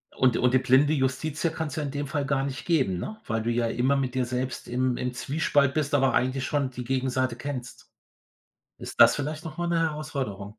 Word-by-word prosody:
Und 130 Hz, -3 st, +3 dB
und 125 Hz, 0 st, +2 dB
die -, -, +6 dB
blinde 135 Hz, +4 st, +4 dB
Justitia 145 Hz, +4 st, 0 dB
kann's 160 Hz, -4 st, -4 dB
ja 155 Hz, -, -2 dB
in 140 Hz, -, -3 dB
dem 145 Hz, 0 st, -3 dB
Fall 145 Hz, 0 st, -2 dB
gar 135 Hz, -1 st, 0 dB
nicht 135 Hz, -1 st, -5 dB
geben, 135 Hz, -, +2 dB
ne, 215 Hz, -, -5 dB
weil 115 Hz, -1 st, -1 dB
du 120 Hz, -, 0 dB
ja 120 Hz, 0 st, +1 dB
immer 125 Hz, +4 st, +1 dB
mit 130 Hz, -2 st, -2 dB
dir 130 Hz, -, +1 dB
selbst 125 Hz, +1 st, -3 dB
im 125 Hz, 0 st, 0 dB
im 125 Hz, 0 st, -2 dB
Zwiespalt 140 Hz, +1 st, +1 dB
bist, 150 Hz, -2 st, -1 dB
aber 135 Hz, -2 st, +3 dB
eigentlich 130 Hz, +1 st, +1 dB
schon 145 Hz, -2 st, 0 dB
die 125 Hz, 0 st, -6 dB
Gegenseite 130 Hz, -1 st, 0 dB
kennst. 125 Hz, -1 st, -7 dB, 0.9 s
Ist -, -, -7 dB
das -, -, +8 dB
vielleicht 150 Hz, +2 st, -4 dB
noch 155 Hz, -2 st, -7 dB
mal 175 Hz, -, -1 dB
'ne 170 Hz, -1 st, +1 dB
Herausforderung? 150 Hz, -10 st, -3 dB
135 Hz, 215 wpm, -26 LUFS, 125-145 Hz, 0.9 s, das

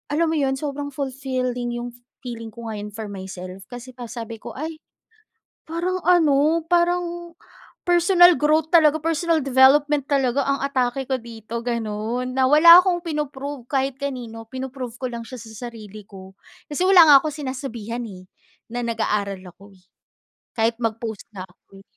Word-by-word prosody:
alam 330 Hz, 0 st, +2 dB
mo 320 Hz, -, 0 dB
'yon, 270 Hz, -1 st, +1 dB
sobrang 285 Hz, 0 st, -4 dB
fulfilling 255 Hz, -3 st, -3 dB
'yong 240 Hz, 0 st, -5 dB
f -, -, -16 dB, 0.2 s
feeling 230 Hz, -3 st, -7 dB
ko 230 Hz, +1 st, -9 dB
ngayon 210 Hz, -1 st, -6 dB
for 215 Hz, 0 st, -7 dB
myself. 190 Hz, -1 st, -8 dB
Kasi 245 Hz, +1 st, -9 dB
pa, 245 Hz, -, -8 dB
sabi 230 Hz, -2 st, -6 dB
ko, -, -, -7 dB
"Ay, 315 Hz, +4 st, -6 dB, 0.9 s
parang 360 Hz, +3 st, -2 dB
ano, 320 Hz, -2 st, +3 dB
parang, 345 Hz, 0 st, 0 dB, 0.6 s
personal 350 Hz, 0 st, +6 dB
growth 310 Hz, +1 st, +2 dB
talaga, 315 Hz, -2 st, +6 dB
personal 330 Hz, +1 st, +1 dB
development 275 Hz, +2 st, +4 dB
talaga 275 Hz, -1 st, +2 dB
ang 275 Hz, 0 st, 0 dB
atake 265 Hz, -1 st, -1 dB
ko 265 Hz, -, 0 dB
dito," 230 Hz, 0 st, -7 dB
gano'n, 235 Hz, +1 st, -3 dB
na 265 Hz, -, +2 dB
wala 335 Hz, +4 st, +9 dB
akong 355 Hz, -2 st, 0 dB
pino-prove 285 Hz, -3 st, -4 dB
kahit 270 Hz, -1 st, 0 dB
kanino, 240 Hz, -5 st, -5 dB
pino-prove 260 Hz, -2 st, -6 dB
ko 255 Hz, -, -3 dB
lang 235 Hz, -1 st, -6 dB
siya 255 Hz, +2 st, -9 dB
sa 225 Hz, +1 st, -8 dB
sarili 215 Hz, -2 st, -11 dB
ko. 190 Hz, -1 st, -13 dB, 0.4 s
Kasi 295 Hz, +5 st, -2 dB
wala 370 Hz, -4 st, +8 dB
nga 290 Hz, -, +9 dB
akong 305 Hz, -2 st, -3 dB
sinasabihan, 240 Hz, -3 st, -5 dB
eh, 185 Hz, -2 st, -12 dB, 0.5 s
na 245 Hz, 0 st, -3 dB
nag-aaral 210 Hz, -4 st, -2 dB
ako, 200 Hz, +3 st, -15 dB
eh, 180 Hz, -, -29 dB, 0.7 s
kahit 225 Hz, +1 st, +2 dB
mag 225 Hz, 0 st, -1 dB
post 220 Hz, -3 st, -6 dB
nga 190 Hz, -2 st, -8 dB
ako, 195 Hz, +2 st, -20 dB
eh. -, -, -15 dB
255 Hz, 165 wpm, -22 LUFS, 225-300 Hz, 0.9 s, wala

